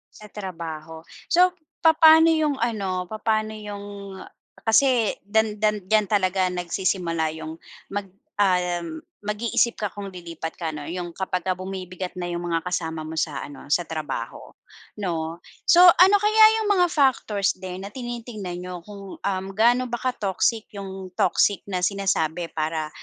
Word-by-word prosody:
Sa 210 - -12
trabaho? 165 -5 -7 0.2
So, 360 +1 +5 0.3
papa'no 320 0 +7
yung 310 -3 +2
ano, 195 -6 -1
papa'no 215 +1 -1
'yong 205 -1 -7 0.8
kasi 235 0 +3
dan 215 +1 +1
dan 210 -2 +1
diyan 215 0 +3
talaga 185 -2 +2
nagsisimula 175 -2 -1
yung 160 0 -6 0.4
mag 200 0 -3 0.3
ah, 180 -3 +2 0.4
mag-iisip 230 +2 +1
ka 210 - 0
kung 200 0 -8
lilipat 170 -2 -6
ka 165 - -2
'no. 150 -2 -6
Yung 175 0 -4
kapagka 185 -1 -2
bumibigat 185 -1 -6
na 180 -1 -4
'yong 175 0 -3
mga 165 - +1
kasama 160 -3 -2
mo 160 +1 -7
sa 150 -3 -1
ano, 145 -1 -9
sa 175 - +3
trabaho 155 -1 -5 0.5
'no. 165 -2 -3 0.3
So, 350 - +7
ano 365 +3 +8
kaya 430 +1 +5 0.2
yung 425 - -1
mga 375 -3 +5
factors 250 - +2
din 185 0 -7
na - - -6
tinitignan 230 -6 -6
niyo 180 -1 -7
kung, 200 -2 -10
um, 190 -1 -2
kung - - -20
gaano 240 +3 +4
ba 240 - -2
ka-toxic 225 -2 -1
yung 190 -1 -7
toxic 200 +2 +2
na 185 -2 -3
sinasabi 180 -4 0
para, 155 0 -2
195 Hz, 150 wpm, -24 LUFS, 175-220 Hz, 0.8 s, ano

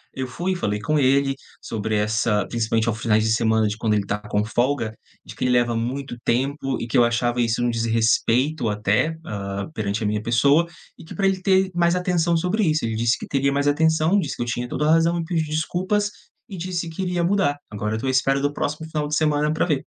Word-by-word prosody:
eu 130 -1 -3
fui 175 +9 -3
e - - 0
falei 105 - -2
com 150 +8 0
ele 135 0 +3 0.3
sobre 110 0 -3
essa 105 -1 +1
principalmente 115 -1 0
aos 110 -1 -1
finais 110 -1 +2
de 110 - +1
semana 110 -1 +2
de 105 - -2
quando 110 -1 0
ele 105 - +1
estava 105 +1 -3
com 105 0 +1
folga, 120 0 0 0.3
de - - -9
que - - -4
ele 125 - +2
leva 120 -1 +2
muito 125 +3 -3
tempo 135 +2 -1
e - - -3
que 115 - -5
eu 120 - +6
achava 120 +1 +1
isso 115 0 0
um 120 - +2
desrespeito 115 +4 +1
até, 105 +9 +1
hã, 100 -1 -4
perante 105 -3 -2
a - - -1
minha 105 0 -1
pessoa, 140 +9 +3 0.3
e - - -11
que 160 - -10
pra 200 - 0
ele 190 -1 0
ter 190 0 +2
mais 170 0 +2
atenção 175 -2 +1
sobre 180 +6 0
isso. 155 -6 +1
Ele 115 -1 -2
disse 115 +2 +1
que - - -7
teria 140 0 +1
mais 140 +1 0
atenção, 160 +5 +3
disse - - -3
que - - -3
eu - - -4
tinha 120 +1 -3
toda 150 - -1
a - - +4
razão, 165 +1 +3
me 170 - -2
pediu 165 -2 -1
desculpas 185 +7 -1 0.4
e 195 - -8
disse 175 -1 -3
que 160 - -5
iria 180 -2 -1
mudar. 180 -5 +1
Agora 105 +1 -2
eu - - -3
tô 115 - -5
à - - +1
espera 135 +1 +2
do 145 +1 -1
próximo 155 +2 -3
final 150 -2 -2
de 150 - -1
semana 150 -1 +1
pra 155 - +1
ver. 150 -6 0
135 Hz, 240 wpm, -23 LUFS, 115-160 Hz, 0.4 s, eu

